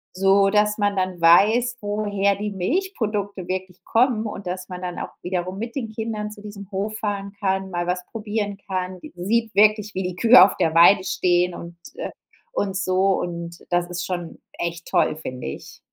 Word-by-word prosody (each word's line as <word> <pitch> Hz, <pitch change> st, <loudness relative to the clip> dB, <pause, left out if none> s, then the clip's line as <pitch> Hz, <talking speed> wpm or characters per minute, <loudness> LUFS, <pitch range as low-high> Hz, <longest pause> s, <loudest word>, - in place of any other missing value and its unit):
so, 195 Hz, +1 st, +4 dB
dass 210 Hz, 0 st, +2 dB
man 205 Hz, -1 st, +1 dB
dann 185 Hz, -2 st, -1 dB
weiß, 220 Hz, +9 st, +5 dB
woher 205 Hz, -1 st, 0 dB
die 210 Hz, +1 st, -4 dB
Milchprodukte 205 Hz, -, -2 dB
wirklich 185 Hz, -1 st, -5 dB
kommen 230 Hz, -2 st, +2 dB
und 200 Hz, -2 st, -7 dB
dass 185 Hz, +1 st, -5 dB
man 180 Hz, 0 st, -7 dB
dann 180 Hz, -1 st, -4 dB
auch -, -, -5 dB
wiederum 180 Hz, +1 st, -3 dB
mit 230 Hz, +1 st, -5 dB
den 245 Hz, -5 st, -3 dB
Kindern 220 Hz, -1 st, -4 dB
zu 210 Hz, -, -12 dB
diesem 200 Hz, -2 st, -9 dB
Hof 205 Hz, +3 st, -3 dB
fahren 200 Hz, -2 st, -3 dB
kann, 190 Hz, -1 st, -1 dB
mal 175 Hz, 0 st, -2 dB
was 180 Hz, 0 st, -2 dB
probieren 210 Hz, -2 st, -3 dB
kann, 185 Hz, -1 st, -3 dB
d -, -, -10 dB
sieht 220 Hz, +4 st, -1 dB
wirklich, 210 Hz, 0 st, +4 dB
wie 190 Hz, -, -1 dB
die 180 Hz, -1 st, -4 dB
Kühe 230 Hz, +2 st, +8 dB
auf 195 Hz, -, +3 dB
der 160 Hz, 0 st, +1 dB
Weide 185 Hz, +3 st, +7 dB
stehen 180 Hz, 0 st, +1 dB
und 170 Hz, 0 st, -9 dB, 0.2 s
äh, -, -, -5 dB, 0.4 s
und 195 Hz, -2 st, -1 dB
so, 190 Hz, 0 st, +2 dB
und 170 Hz, -1 st, -5 dB
das 175 Hz, 0 st, +1 dB
ist 175 Hz, 0 st, -4 dB
schon 175 Hz, -2 st, -5 dB, 0.2 s
echt 170 Hz, 0 st, -3 dB
toll, -, -, +2 dB
finde 130 Hz, -5 st, -6 dB
ich. 70 Hz, -, -8 dB
195 Hz, 190 wpm, -23 LUFS, 180-210 Hz, 0.4 s, Kühe